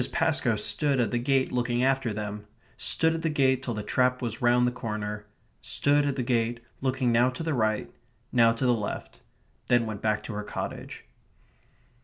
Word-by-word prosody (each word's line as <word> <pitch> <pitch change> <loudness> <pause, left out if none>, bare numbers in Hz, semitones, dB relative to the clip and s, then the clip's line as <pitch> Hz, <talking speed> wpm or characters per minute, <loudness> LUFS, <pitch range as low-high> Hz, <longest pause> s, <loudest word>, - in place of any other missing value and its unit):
Pascoe - - +2
stood 140 -3 +2
at 115 -3 +1
the 120 - 0
gate 135 +1 +1
looking 120 0 0
after 135 -3 +1
them; 105 0 -5 0.3
stood 160 0 +2
at 165 - -3
the 165 - 0
gate 130 -3 +2
till 120 -3 -4
the 105 - -4
trap 125 +2 +1
was 115 -3 -4
round 120 0 +4
the 125 - +1
corner; 105 -3 -5 0.3
stood 145 0 +2
at 140 - -1
the 130 - -1
gate, 120 -1 0 0.2
looking 130 -2 +1
now 120 +2 +4
to 130 +5 -6
the 160 -1 -1
right, 110 -4 0 0.4
now 115 -2 +5
to 115 +3 -2
the 125 - +4
left; 105 -3 -5 0.5
then 120 -1 +3
went 110 -2 -5
back 110 -1 0
to - - -6
her 105 - -3
cottage. - - -6
120 Hz, 190 wpm, -27 LUFS, 110-130 Hz, 0.5 s, now